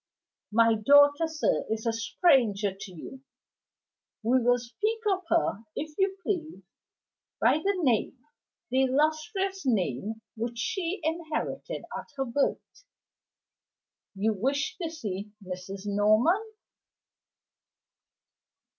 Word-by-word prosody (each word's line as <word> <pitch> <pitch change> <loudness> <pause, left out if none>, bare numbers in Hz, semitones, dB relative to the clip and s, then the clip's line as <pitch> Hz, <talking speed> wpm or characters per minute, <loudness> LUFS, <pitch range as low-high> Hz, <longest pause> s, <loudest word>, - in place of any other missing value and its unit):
"My 230 +1 +5
daughter, 285 +7 +5
sir, 315 -1 0
is 220 +1 -2
a 230 - +1
stranger 225 - +2
to 195 0 -9
you. 220 +10 -10 1.0
We 250 +3 +3
will 245 +1 +4
speak 415 - -2 0.2
of 380 - -3
her, 325 -10 +1
if 305 0 -5
you 385 0 +1
please, 320 - -3 0.8
by 305 - +4
the 395 +5 0
name 250 0 +1 0.5
the 260 +1 +3
illustrious 310 - 0
name 220 - -1
which 235 +1 -4
she 360 - -2
inherited 325 +9 -3
at - - -6
her 270 - 0
birth. 275 - -2 1.3
You 215 +3 +1
wish 275 - -1
to 330 - -1
see 210 - -6
Mrs. 185 +2 -7
Norman?" 215 - +3
260 Hz, 110 wpm, -28 LUFS, 215-325 Hz, 1.3 s, My